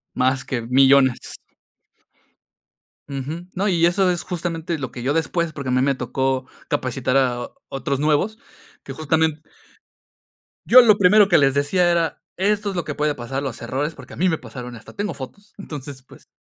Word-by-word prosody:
Más 130 +1 +1
que 120 -3 -2
millones. 130 +1 +3 1.7
Ujú. 145 +6 -5
No, 195 +3 -1
y 170 -3 +3
eso 185 +2 +3
es 175 -1 -1
justamente 170 -2 -3
lo 130 -4 -5
que 120 - -7
yo 140 - +1
después 165 +1 -1
porque 140 -4 -5
a - - 0
mí 130 0 +2
me 140 0 +2
tocó 130 +1 -2 0.2
capacitar 130 0 -1
a 120 -2 0 0.2
otros 135 0 -2
nuevos, 155 +9 +1 0.4
que 135 - -7
justamente 155 +1 0 1.2
Yo 255 +1 +9
lo 215 -4 +5
primero 205 +2 +6
que - - +6
les 135 -2 +4
decía 175 +5 +2
era: 170 -1 0 0.2
"Esto 205 +1 +1
es - - -7
lo 175 - -1
que 145 - -4
puede 150 0 0
pasar, 135 +2 -5
los 130 -4 -5
errores, 145 +5 -2
porque - - -13
a - - -11
mí 185 +1 +2
me 160 - -1
pasaron 125 +1 -9
y - - -9
hasta 115 - -14
tengo 205 -3 -2
fotos". 145 +10 -10
Entonces, 145 -6 -8
pues 130 - -18
145 Hz, 185 wpm, -22 LUFS, 130-175 Hz, 1.7 s, Yo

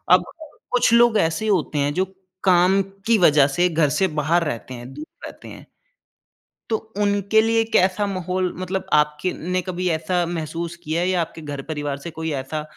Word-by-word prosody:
अब - - +6 0.5
कुछ 245 -1 +3
लोग 235 -1 +5
ऐसे 165 +4 0
होते 170 -6 +1
हैं 145 +1 +1
जो 185 - +1 0.4
काम 185 +1 +4 0.3
की 230 -1 +4
वज़ह 150 -6 +5
से 175 +1 +3
घर 160 -3 +2
से 190 - +3
बाहर 170 +3 +2
रहते 130 -3 -5
हैं, 120 +2 -9
दूर 150 +2 -8 0.2
रहते - - -11
हैं। - - -12 1.0
तो 220 - +3 0.3
उनके 205 +1 +2
लिए 225 0 +2
कैसा 190 +3 +3
माहौल 185 -1 -2
मतलब 185 +1 -3
आपके 150 +4 +2 0.2
ने 185 - +2
कभी 180 0 -3
ऐसा 170 +2 0
महसूस 170 0 -4
किया 160 +2 -1
है 180 - 0
या 185 -1 +1
आपके 165 0 -5
घर 145 -2 -6
परिवार 145 -2 -3
से 170 - -4
कोई 160 0 -2
ऐसा 155 +3 -4
175 Hz, 185 wpm, -22 LUFS, 155-190 Hz, 1.0 s, अब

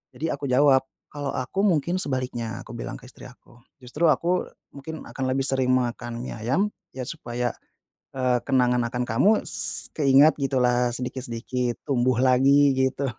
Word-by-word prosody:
jadi 160 - -2
aku 140 - -7
jawab, 135 0 +5 0.3
kalau 145 -2 -4
aku 130 +9 -4
mungkin 170 -1 +1
sebaliknya, 125 - -3
aku - - -11
bilang 120 - -6
ke - - -22
istri - - -13
aku, 125 -1 -20 0.2
justru 150 +7 0
aku 175 +4 +1 0.3
mungkin 155 +3 -8
akan 135 - -4
lebih 135 +1 0
sering 130 -1 +1
makan 120 -1 -2
mie - - -6
ayam 130 - 0 0.3
ya, 130 - -4
supaya, 120 0 -3 0.7
eee, 125 -1 +2
kenangan 125 -2 +2
akan 125 +1 -2
kamu 120 - +3 0.2
s - - +1
keingat 145 +1 +5
gitulah, 125 -2 +2
sedikit-sedikit 125 -1 -4
tumbuh 130 -3 +1
lagi, 135 +2 +4
gitu. 130 +1 0
130 Hz, 155 wpm, -24 LUFS, 125-140 Hz, 0.7 s, jawab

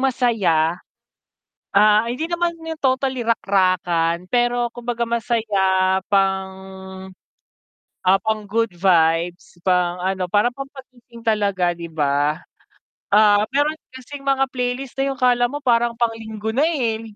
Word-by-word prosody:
masaya. 200 -11 +1 0.9
Ah, 210 +2 +5
hindi 250 +7 -3
naman 345 0 0
yung 325 -1 -6
totally 260 -1 0
rakrakan 185 -5 +1
pero 240 0 +1
kumbaga 240 -1 -3
masaya 200 -5 +1
pang, 190 -1 +1 1.6
ah, 190 +1 +5
pang 220 -1 -1
good 225 +2 0
vibes, 170 -1 +1
pang 180 -1 +1
ano, 190 -1 -1
parang 210 +6 +1
pangpagising 255 -3 -12
talaga, 200 -6 +1
'di 170 0 -8
ba. 145 0 0 0.7
Ah, 205 0 +5
mayro'n 295 +3 +1 0.2
kasing 265 +2 -10
mga 270 0 +2
playlist 250 +1 -3
na 270 - +1
yung - - -14
akala 245 -1 +3
mo 290 +3 -6
parang 235 -3 +2
pang-Linggo 220 -2 -3
na, 275 +6 +2
eh, 240 -9 -1
220 Hz, 120 wpm, -21 LUFS, 185-245 Hz, 1.6 s, Ah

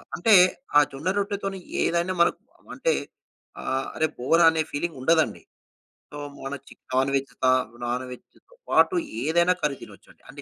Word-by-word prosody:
అంటే 215 +5 +3 0.4
ఆ - - +10
జొన్న 145 +7 -3
రొట్టెతోని 195 -1 -3 0.2
ఏదైనా 170 +2 0
మనకు 170 - +2 0.4
అంటే - - +1 0.7
ఆహ్, 135 0 -2
అరే 160 0 +1
బోర్ 165 +8 +2
అనే 160 -1 0
ఫీలింగ్ 160 0 -3
ఉండదండి. 160 +4 +2 0.7
సో 145 - -8 0.2
మోనచిక్ 135 +1 -9
నాన్‌వెజ్ 135 0 0
త - - +4 0.4
నాన్‌వెజ్‌తో 125 - -7 0.2
పాటు 375 - +4 0.3
ఏదైనా 170 +4 +3
కర్రీ 145 -2 -1
తినొచ్చండి. - - -16
అంటే - - -10
160 Hz, 135 wpm, -25 LUFS, 135-180 Hz, 0.7 s, ఆ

